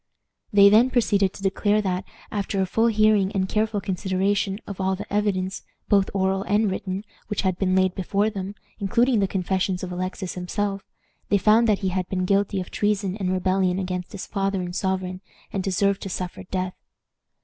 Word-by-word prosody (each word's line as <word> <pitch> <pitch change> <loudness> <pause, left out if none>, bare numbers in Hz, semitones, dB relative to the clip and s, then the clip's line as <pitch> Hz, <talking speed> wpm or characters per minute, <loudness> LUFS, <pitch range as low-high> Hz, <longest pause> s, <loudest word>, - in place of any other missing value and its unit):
They 200 -1 +7
then 220 +5 +6
proceeded 205 -6 +2
to 195 - -11
declare 205 +2 +2
that, 185 -2 -1 0.3
after 200 -1 -2
a 190 - +3
full 225 +5 +2
hearing 215 -3 +3
and 190 -2 0
careful 215 +1 0
consideration 195 +1 0
of 195 -2 -6
all 190 0 +1
the 190 - -6
evidence, 195 -2 0 0.3
both 200 -2 +4
oral 190 0 +1
and 205 +1 +1
written, 190 +1 -4 0.2
which 210 - -2
had 185 -2 0
been 185 -1 +2
laid 185 -1 +3
before 200 +3 0
them, 195 0 -5 0.2
including 235 +4 +2
the 195 - +2
confessions 190 0 -1
of 180 - -4
Alexis 185 +1 -4
himself, 195 +2 -2 0.5
they 205 - +4
found 220 +4 +4
that 210 -3 +3
he - - +2
had 185 -1 -2
been 185 -1 -1
guilty 200 0 +1
of 180 - -6
treason 205 -2 0
and 185 -3 -1
rebellion 185 0 +1
against 180 -1 -3
his 200 - -6
father 195 -1 -1
and 175 0 -5
sovereign, 185 -1 -2 0.3
and 195 - 0
deserved 195 +1 +1
to 195 - -5
suffer 180 0 -4
death. 185 0 -2
195 Hz, 185 wpm, -24 LUFS, 185-205 Hz, 0.5 s, They